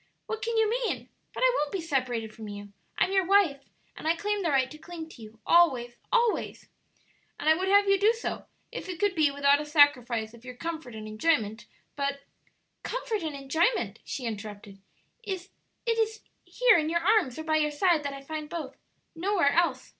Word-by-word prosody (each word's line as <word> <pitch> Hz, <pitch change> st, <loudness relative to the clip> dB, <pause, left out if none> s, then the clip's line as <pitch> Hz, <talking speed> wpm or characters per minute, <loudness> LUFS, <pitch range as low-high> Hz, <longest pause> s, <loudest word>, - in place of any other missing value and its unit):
"What 445 Hz, 0 st, -4 dB
can 455 Hz, +2 st, -1 dB
you 445 Hz, -1 st, +4 dB
mean? 480 Hz, +2 st, -2 dB, 0.2 s
But -, -, -7 dB
I -, -, +6 dB
won't 295 Hz, -1 st, -1 dB
be 390 Hz, -, -2 dB
separated 250 Hz, -8 st, -2 dB
from 220 Hz, -1 st, -9 dB
you; 205 Hz, 0 st, -9 dB, 0.2 s
I'm -, -, +2 dB
your 385 Hz, -1 st, +3 dB
wife, 360 Hz, -7 st, +3 dB, 0.3 s
and -, -, -6 dB
I 325 Hz, -, +3 dB
claim 415 Hz, +3 st, -1 dB
the 340 Hz, -, 0 dB
right 265 Hz, -2 st, +2 dB
to 305 Hz, -, -11 dB
cling 325 Hz, 0 st, -8 dB
to 255 Hz, -, -14 dB
you 220 Hz, +1 st, -12 dB
always, 260 Hz, -9 st, +4 dB, 0.2 s
always!" 475 Hz, -2 st, +1 dB, 0.7 s
"And -, -, -4 dB
I 315 Hz, -, +8 dB
would 370 Hz, +4 st, -2 dB
have 405 Hz, +1 st, +5 dB
you 395 Hz, 0 st, +4 dB
do 420 Hz, +3 st, +5 dB
so, 465 Hz, -, -5 dB, 0.2 s
if -, -, -6 dB
it 355 Hz, -2 st, -5 dB
could 410 Hz, -2 st, +2 dB
be 310 Hz, -4 st, +3 dB
without 280 Hz, +1 st, +3 dB
a -, -, -3 dB
sacrifice 250 Hz, -7 st, +3 dB
of 235 Hz, 0 st, -15 dB
your 250 Hz, 0 st, -9 dB
comfort 320 Hz, -5 st, -6 dB
and 215 Hz, 0 st, -7 dB
enjoyment, 220 Hz, -2 st, 0 dB, 0.3 s
but 280 Hz, 0 st, -2 dB, 0.3 s
" -, -, -44 dB, 0.3 s
"Comfort 460 Hz, -4 st, -3 dB
and 315 Hz, -3 st, -4 dB
enjoyment!" 320 Hz, -, 0 dB
she 255 Hz, -, -5 dB
interrupted; 205 Hz, -2 st, -7 dB, 0.4 s
"it 380 Hz, -3 st, -5 dB, 0.4 s
is 450 Hz, -1 st, 0 dB, 0.2 s
here -, -, +4 dB
in 310 Hz, 0 st, -1 dB
your 340 Hz, +1 st, +1 dB
arms 375 Hz, -, +2 dB
or 315 Hz, -, -5 dB
by 315 Hz, 0 st, +1 dB
your 300 Hz, -1 st, +2 dB
side 320 Hz, +2 st, +2 dB
that 285 Hz, -1 st, -3 dB
I 275 Hz, -, -9 dB
find 305 Hz, +1 st, -6 dB
both; 305 Hz, -5 st, -6 dB, 0.4 s
nowhere 345 Hz, -3 st, +2 dB
else. 305 Hz, -7 st, +1 dB
315 Hz, 200 wpm, -28 LUFS, 260-390 Hz, 0.7 s, I